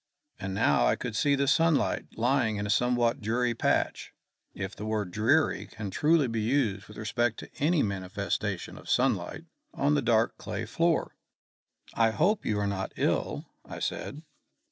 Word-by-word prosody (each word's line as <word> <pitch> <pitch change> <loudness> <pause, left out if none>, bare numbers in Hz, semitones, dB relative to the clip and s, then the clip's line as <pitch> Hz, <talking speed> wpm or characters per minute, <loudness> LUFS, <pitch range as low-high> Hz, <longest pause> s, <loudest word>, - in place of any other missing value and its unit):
And 95 0 -4
now 70 - +3
I - - +3
could - - -5
see 140 +4 +3
the 140 0 0
sunlight 165 +1 +2
lying 120 -2 +2
in 100 0 -2
a 105 - -1
somewhat 120 +2 +2
dreary 120 +3 0
patch, - - 0 0.4
if 95 0 -5
the - - -7
word 105 -4 -1
dreary 120 - +2
can 105 -2 -6
be - - -9
truly 145 -7 +2
used 115 -2 0
with 105 - -13
respect 115 +2 0
to - - -11
any 155 +2 +3
manifestation 95 -3 -3
of - - -12
sunlight, - - +1 0.3
on 145 +2 +2
the 145 - +2
dark 115 -2 +2
clay 110 +1 -4
floor. 165 +8 0 0.8
"I 115 -1 +3
hope 190 - +1
you 105 - +1
are 100 - 0
not 95 -1 -3
ill," - - -1 0.2
I - - -9
said. 150 +3 -4
115 Hz, 165 wpm, -28 LUFS, 105-140 Hz, 0.8 s, now